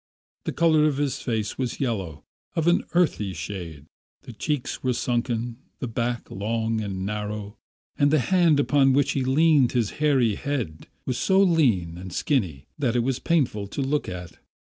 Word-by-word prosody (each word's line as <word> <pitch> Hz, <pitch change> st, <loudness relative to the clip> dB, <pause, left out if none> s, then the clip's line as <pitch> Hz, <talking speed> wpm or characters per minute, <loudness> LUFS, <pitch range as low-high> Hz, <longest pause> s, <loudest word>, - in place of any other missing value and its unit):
The -, -, -1 dB
colour 160 Hz, -2 st, +4 dB
of 150 Hz, -3 st, +1 dB
his 145 Hz, -2 st, -1 dB
face 110 Hz, -2 st, -2 dB
was 125 Hz, -3 st, -2 dB
yellow, 95 Hz, -, -3 dB, 0.3 s
of 165 Hz, -, 0 dB
an 175 Hz, +1 st, +3 dB
earthy 145 Hz, -, +1 dB
shade; 80 Hz, -3 st, -6 dB, 0.4 s
the 120 Hz, -, -10 dB
cheeks 145 Hz, +3 st, -3 dB
were 130 Hz, -1 st, +1 dB
sunken, 120 Hz, -1 st, -1 dB, 0.2 s
the 125 Hz, -, -4 dB
back 120 Hz, +1 st, -3 dB
long 110 Hz, +2 st, -1 dB
and 95 Hz, -2 st, -4 dB
narrow, 105 Hz, 0 st, -4 dB, 0.4 s
and 145 Hz, -, +5 dB
the 155 Hz, -, +4 dB
hand 165 Hz, +2 st, +3 dB
upon 140 Hz, -2 st, +4 dB
which 140 Hz, 0 st, +3 dB
he 135 Hz, -, 0 dB
leaned 140 Hz, 0 st, +4 dB
his 120 Hz, -5 st, +1 dB
hairy 135 Hz, -7 st, +3 dB
head 115 Hz, -, -4 dB, 0.2 s
was 125 Hz, -, -2 dB
so 190 Hz, 0 st, +3 dB
lean 120 Hz, -, +2 dB
and 95 Hz, 0 st, -8 dB
skinny 90 Hz, -, -1 dB
that 125 Hz, -5 st, +1 dB
it 120 Hz, -, +2 dB
was 130 Hz, 0 st, -1 dB
painful 125 Hz, -11 st, 0 dB
to 140 Hz, -, -4 dB
look 145 Hz, +2 st, 0 dB
upon. 90 Hz, -2 st, -7 dB
120 Hz, 170 wpm, -25 LUFS, 105-145 Hz, 0.4 s, and